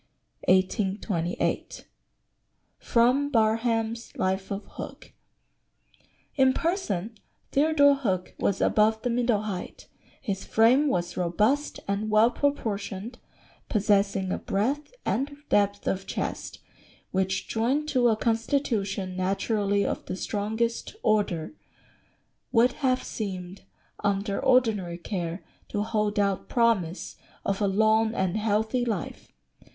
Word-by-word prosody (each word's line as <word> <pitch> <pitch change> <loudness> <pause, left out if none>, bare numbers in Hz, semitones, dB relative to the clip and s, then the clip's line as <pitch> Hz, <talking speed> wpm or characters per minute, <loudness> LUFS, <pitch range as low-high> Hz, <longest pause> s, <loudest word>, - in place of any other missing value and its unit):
1828. 185 -2 0 0.9
[Sidenote: 255 +5 +2
Barham's 225 0 +1
Life 190 +1 -1
of 200 +1 -4
Hook.] - - -9 1.2
"In 265 -1 +4
person 235 - -2 0.4
Theodore 285 0 +5
Hook 190 -10 -2
was 195 - 0
above 220 +1 +3
the 245 - 0
middle 235 -3 +1
height, 195 -4 -6 0.3
his 195 -6 -3
frame 245 +7 +4
was 175 -8 -1
robust 210 - +1
and 200 +2 -1
well 215 +2 +5
proportioned, 225 -5 -2 0.5
possessing 200 -2 +2
a - - -1
breadth 270 - -1
and 285 +3 -1
depth 205 0 +2
of 195 0 -2
chest - - -4 0.5
which, 190 0 -1
joined 260 +7 0
to 255 -4 +3
a 220 -2 +3
constitution 225 -6 -1
naturally 200 +2 0
of - - -3
the - - -3
strongest 220 - -2
order, 200 - +1 1.0
would 245 +1 +5
have 255 -2 +2
seemed, 190 -3 -6 0.4
under 200 0 0
ordinary 220 -9 +2
care, 175 -1 -4 0.3
to 205 - -1
hold 215 -1 -1
out 200 -2 0
promise 215 -8 +1 0.3
of 200 +1 -1
a 205 - +3
long 220 +3 +3
and 190 0 0
healthy 220 +3 +1
life. 220 -7 -4
215 Hz, 110 wpm, -27 LUFS, 195-235 Hz, 1.2 s, Theodore